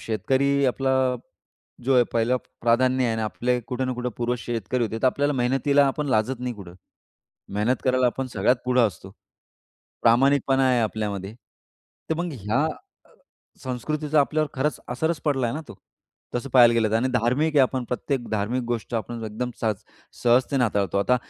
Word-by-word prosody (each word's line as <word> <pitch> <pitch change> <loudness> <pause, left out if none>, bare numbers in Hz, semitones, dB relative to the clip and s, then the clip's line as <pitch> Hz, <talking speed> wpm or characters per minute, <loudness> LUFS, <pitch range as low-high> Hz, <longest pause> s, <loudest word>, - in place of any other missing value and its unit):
शेतकरी 135 +5 +1
आपला 130 +1 0 0.9
जो 135 - +3
आहे, 125 - +6
पहिलं 115 +2 +2 0.2
प्राधान्य 130 +2 +2
आहे 115 - +1
आणि 110 - -2
आपले 125 +3 -1
कुठे 130 +1 -2
ना 130 - -1
कुठे 125 0 -3
पूर्वज 120 +1 -1
शेतकरी 120 +1 -2
होते. 110 +1 -4
तर 130 - +4
आपल्याला 145 +3 +1
मेहनतीला 135 +2 +2
आपण 145 +2 -1
लाजत 120 +1 0
नाही 125 -1 -3
कुठे. 100 -5 -10 0.8
मेहनत 110 +5 +1
करायला 130 -1 +3
आपण 130 +2 -2
सगळ्यात 110 +5 +3
पुढे 125 0 +2
असतो. 95 -4 -1 0.9
प्रामाणिकपणा 135 +2 +4
आहे 125 -2 +3
आपल्यामध्ये. 105 -2 -3 0.8
तर - - +3
मग 175 +1 -2
ह्या 115 +3 -1
अ, 370 - -10 0.5
संस्कृतीचा 150 +4 0
आपल्यावर 155 +1 0
खरंच 150 +3 -1
असरच 160 +6 -1
पडला 135 -6 +1
ना 155 - -4
तो, - - -9 0.6
तसं 120 +3 -2
पाहायला 120 -2 +6
गेलं 110 -2 +2
तर. 110 - +2
आणि 125 +3 +1
धार्मिक 125 +7 +1
आहे 135 - +7
आपण. 130 -1 0
प्रत्येक 125 +1 -3
धार्मिक 110 +4 -1
गोष्ट 120 0 -3
आपण 115 0 -4
एकदम 110 +3 -4
सहज-सहजतेने 120 +4 0
हाताळतो. 100 -3 0
आता 125 +5 +3
125 Hz, 165 wpm, -24 LUFS, 115-135 Hz, 0.9 s, आहे